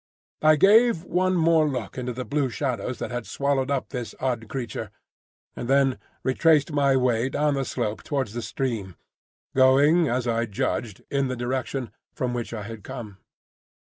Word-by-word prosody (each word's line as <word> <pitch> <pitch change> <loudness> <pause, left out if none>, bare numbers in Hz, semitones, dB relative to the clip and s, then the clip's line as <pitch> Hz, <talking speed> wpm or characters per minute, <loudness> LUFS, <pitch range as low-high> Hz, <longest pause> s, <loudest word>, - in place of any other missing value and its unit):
I 155 0 +6
gave 210 +2 +5
one 185 +1 +1
more 160 -2 +4
look 125 -7 -4
into 125 -1 -3
the 125 +1 -5
blue 145 -2 0
shadows 125 -2 -2
that - - -5
had 120 -1 -4
swallowed 140 -1 0
up 140 -2 -1
this 120 -5 -5
odd 120 -4 -2
creature, 120 -4 -4 0.7
and 120 - -5
then 135 -1 +3 0.2
retraced 150 +3 +3
my 140 -2 +3
way 125 -1 +1
down 150 +1 +1
the 135 -1 0
slope 105 -2 -3
towards 135 -8 -2
the 120 - -3
stream, 110 -9 -3 0.6
going 140 +6 +5
as 125 0 -1
I 115 0 0
judged 105 0 -3
in 140 -1 +1
the 130 - -2
direction 125 0 -3 0.2
from 125 -1 -2
which 120 -1 -4
I 110 -3 -5
had 110 -1 -8
come. 115 -7 -8
130 Hz, 170 wpm, -25 LUFS, 120-140 Hz, 0.7 s, I